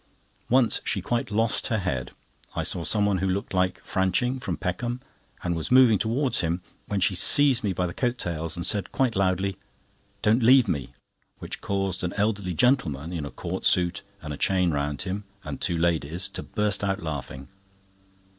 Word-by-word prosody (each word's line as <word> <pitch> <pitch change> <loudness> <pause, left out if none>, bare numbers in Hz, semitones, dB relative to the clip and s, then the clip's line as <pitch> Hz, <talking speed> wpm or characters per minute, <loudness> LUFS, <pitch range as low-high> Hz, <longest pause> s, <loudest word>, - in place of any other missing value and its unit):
Once 125 -1 +3
she - - 0
quite 120 -1 -2
lost 110 +1 +2
her 110 - 0
head. 65 - -2 0.5
I - - -1
saw 85 - -1
someone 100 0 +2
who 95 - 0
looked 95 +2 -2
like 90 -1 0
Franching, 125 +8 0
from 90 -9 -3
Peckham, 120 +9 -3 0.4
and 85 -1 0
was 80 - -3
moving 125 -5 +6
towards 125 +4 0
him 85 +1 -1 0.3
when 100 - -1
she 95 - +2
seized 130 +7 +4
me 100 - +1
by 90 0 -1
the 85 - -4
coat 125 +3 -1
tails, 85 -3 -1
and 85 - -3
said 100 -1 -1
quite 125 -4 +1
loudly: 95 0 +1 0.7
"Don't 110 +4 +4
leave 125 +1 +6
me," 70 -9 -2 0.4
which - - -7
caused 95 -2 -2
an 90 - -2
elderly 100 -4 -1
gentleman, 85 - +1
in 80 -4 -3
a - - -6
court - - -5
suit, 90 -1 +2 0.2
and 75 -1 -5
a - - -7
chain 90 -3 +2
round 70 -1 -1
him, 100 +2 -4 0.2
and 75 -3 -6
two 85 - 0
ladies, 85 +1 +1
to - - -5
burst 105 -3 -1
out 95 -3 -1
laughing. 70 -3 -5
95 Hz, 185 wpm, -26 LUFS, 85-110 Hz, 0.7 s, moving